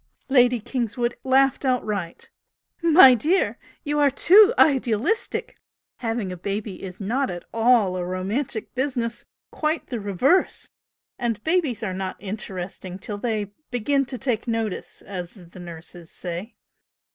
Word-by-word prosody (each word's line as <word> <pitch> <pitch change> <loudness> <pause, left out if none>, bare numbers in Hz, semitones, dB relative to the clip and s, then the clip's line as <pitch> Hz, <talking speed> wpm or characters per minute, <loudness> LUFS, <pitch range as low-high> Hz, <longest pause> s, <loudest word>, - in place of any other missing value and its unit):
Lady 250 -2 +4
Kingswood 240 +1 -2
laughed 270 +1 +3
outright. 210 -9 -2 0.5
"My 325 -5 +8
dear 315 - +2
girl, - - -7 0.3
you 295 0 -1
are 290 -1 +5
too 390 - +7
idealistic! 270 - +1 0.4
Having 225 -5 -2
a 180 - -6
baby 200 +2 -4
is 185 -1 -8
not 245 +7 -1
at 175 0 -6
all 225 -5 +3
a 180 - -2
romantic 200 +7 -3
business! 250 -3 -2 0.3
quite 310 +1 -1
the 240 - -3
reverse! 210 - +1 0.5
And 230 -3 -2
babies 315 - 0
are 190 -4 -2
not 190 0 -4
interesting 190 -2 -6
till 205 +2 -6
they 215 -3 -2 0.2
'begin 275 +4 +1
to 255 +1 -6
take 245 -3 -2
notice' 225 -3 -3
as 180 -2 -8
the 185 - -13
nurses 170 0 -10
say. 180 +6 -6
230 Hz, 135 wpm, -24 LUFS, 195-265 Hz, 0.5 s, My